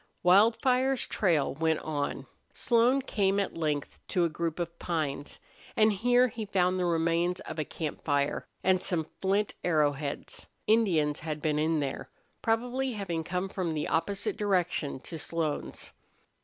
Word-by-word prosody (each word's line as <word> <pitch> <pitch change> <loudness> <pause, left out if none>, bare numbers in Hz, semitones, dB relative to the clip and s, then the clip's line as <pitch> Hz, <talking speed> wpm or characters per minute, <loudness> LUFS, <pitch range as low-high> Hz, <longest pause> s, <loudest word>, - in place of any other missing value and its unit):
Wildfire's 235 +7 +4
trail 165 - +1
went 160 +2 +1
on. 145 -2 -3 0.3
Slone 245 +3 +3
came 200 -5 +1
at 200 - -2
length 150 -3 -2
to 180 -3 +1
a - - +1
group 165 0 -3
of 170 -1 -4
pines, 150 -4 -3 0.4
and 215 0 +4
here 245 +5 +4
he 225 -1 -5
found 185 -2 +1
the 180 - +1
remains 170 +1 +1
of - - -6
a - - +1
camp 155 0 -5
fire, 145 -1 0 0.2
and 185 -1 +3
some 170 -4 -1 0.2
flint 195 +2 +1
arrow 155 -4 +3
heads. 140 0 -6 0.2
Indians 175 -10 +3
had 155 -1 -4
been 150 0 0
in 155 0 +1
there, 135 -2 -4 0.3
probably 245 +3 0
having 175 -6 -3
come 180 +3 -2
from 180 -4 -2
the 150 - -1
opposite 195 +5 -1
direction 180 -9 0
to 165 +2 -6
Slone's. 160 -1 -3
175 Hz, 155 wpm, -29 LUFS, 155-205 Hz, 0.4 s, Wildfire's